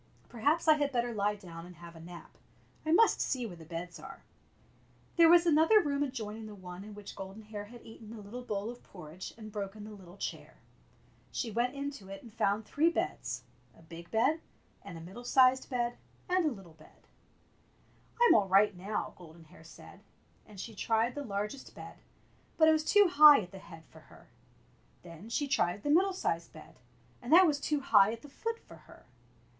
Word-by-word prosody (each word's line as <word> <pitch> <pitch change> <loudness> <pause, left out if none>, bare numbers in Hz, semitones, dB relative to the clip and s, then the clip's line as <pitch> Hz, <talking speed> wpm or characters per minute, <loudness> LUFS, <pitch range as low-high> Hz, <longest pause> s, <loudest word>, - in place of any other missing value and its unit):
Perhaps 290 +9 0
I 310 -1 +7
had 290 -1 0
better 240 -2 -1
lie 205 0 0
down 170 -5 -10
and 180 - -13
have 170 +1 -12
a - - -11
nap. 170 +1 -11 0.6
I - - +2
must 445 +7 +4
see 255 -3 -1
where 190 -6 -7
the 165 -1 -13
beds 170 +1 -7
are," 270 +1 -11 0.9
There 335 -1 +7
was 345 0 +7
another 325 +6 +5
room 285 -6 -1
adjoining 225 -5 -4
the 210 - -10
one 180 -1 -9
in 210 0 -10
which 205 -1 -10
Golden 195 +3 -9
Hair 210 -1 -7
had 240 +3 -14
eaten 225 -1 -12
the 225 0 -9
little 210 +5 -8
bowl 210 -2 -4
of 245 - -13
porridge 175 -1 -10
and 215 -1 -10
broken 205 0 -6
the 215 - -9
little 190 -3 -13
chair. - - -6 0.8
She 230 - -3
went 245 +4 -1
into 280 -8 -6
it 195 0 -9
and 230 -3 -13
found 205 +2 0
three 315 +8 +2
beds 335 - -3 0.2
— - - -29
a - - -18
big 165 +1 -11
bed, 265 +9 +1 0.4
and 170 - -9
a - - -9
middle 190 +9 -10
sized 255 +1 +4
bed, 240 -1 -2 0.3
and 365 -2 +2
a - - +1
little 190 -8 -11
bed. 155 -1 -21 1.1
"I'm 480 0 +7
all 205 -3 +3
right 195 +1 +4
now," 195 +4 -4
Golden 170 -1 -14
Hair 160 +1 -18
said; 165 - -14 0.5
and 210 -3 -13
she 225 +4 -7
tried 225 +3 0
the 290 - -5
largest 210 +3 -5
bed, - - -11 0.6
but 315 - +6
it - - +7
was 310 -1 +2
too 410 +5 +5
high 300 -4 +8
at 180 -3 -10
the 195 - -10
head 165 -3 -13
for 160 - -15
her. 155 - -19 0.7
Then 175 +5 -11
she 285 +5 -1
tried 200 -7 0
the 290 - 0
middle 375 +5 +4
sized 170 - -3
bed, 155 - -14 0.4
and 245 - -7
that 365 +3 +8
was 295 -4 +1
too 295 0 -1
high 205 -5 +5
at 230 0 -8
the 290 - -11
foot 455 +10 -4
for - - -16
her. - - -18
220 Hz, 205 wpm, -31 LUFS, 190-280 Hz, 1.1 s, high